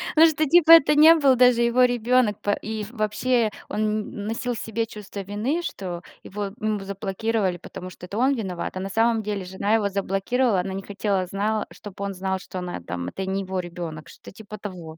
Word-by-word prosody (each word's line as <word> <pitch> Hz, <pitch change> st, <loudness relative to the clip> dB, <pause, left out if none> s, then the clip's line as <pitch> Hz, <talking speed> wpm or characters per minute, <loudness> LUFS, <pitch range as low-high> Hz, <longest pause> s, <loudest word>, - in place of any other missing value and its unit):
Ну, 320 Hz, +1 st, +8 dB
что 310 Hz, -1 st, +1 dB
типа 330 Hz, +1 st, +6 dB
это 300 Hz, -2 st, +8 dB
не 315 Hz, +2 st, +9 dB
был 275 Hz, -5 st, +4 dB
даже 245 Hz, -1 st, +5 dB
его 235 Hz, +2 st, +4 dB
ребенок, 245 Hz, -2 st, +2 dB, 0.2 s
и 215 Hz, -1 st, -4 dB
вообще 225 Hz, +1 st, 0 dB, 0.2 s
он 210 Hz, -, -3 dB
н 210 Hz, -1 st, -2 dB
носил 230 Hz, +2 st, -2 dB
в -, -, -5 dB
себе 225 Hz, +1 st, -2 dB
чувство 210 Hz, -2 st, -9 dB
вины, 215 Hz, -, -2 dB
что 180 Hz, -, -5 dB, 0.2 s
его 205 Hz, +1 st, -5 dB
ему 215 Hz, -1 st, -1 dB
заблокировали, 195 Hz, 0 st, -2 dB
потому 180 Hz, +1 st, -9 dB
что 180 Hz, -, -11 dB
это 200 Hz, +3 st, -6 dB
он 265 Hz, +4 st, +3 dB
виноват, 185 Hz, -5 st, -4 dB
а -, -, -2 dB
на 195 Hz, +1 st, -4 dB
самом 225 Hz, +2 st, +2 dB
деле 205 Hz, -2 st, -3 dB
жена 190 Hz, +3 st, -1 dB
его 210 Hz, -3 st, +1 dB
заблокировала, 200 Hz, +3 st, 0 dB
она 190 Hz, +1 st, -5 dB
не 195 Hz, 0 st, -5 dB
хотела, 200 Hz, -2 st, -1 dB
знала 210 Hz, +3 st, -1 dB
чтоб 200 Hz, -2 st, -11 dB
он 200 Hz, 0 st, -2 dB
знал, 190 Hz, 0 st, -2 dB
что 185 Hz, 0 st, -7 dB
она 180 Hz, -, -5 dB
там 85 Hz, 0 st, -5 dB
это 190 Hz, -, -5 dB
не 190 Hz, +1 st, -1 dB
его 190 Hz, -1 st, -3 dB
ребенок, 170 Hz, -3 st, -6 dB
что-то -, -, -13 dB
типа 210 Hz, +1 st, -10 dB
того. 175 Hz, -6 st, -8 dB
210 Hz, 205 wpm, -24 LUFS, 190-235 Hz, 0.2 s, не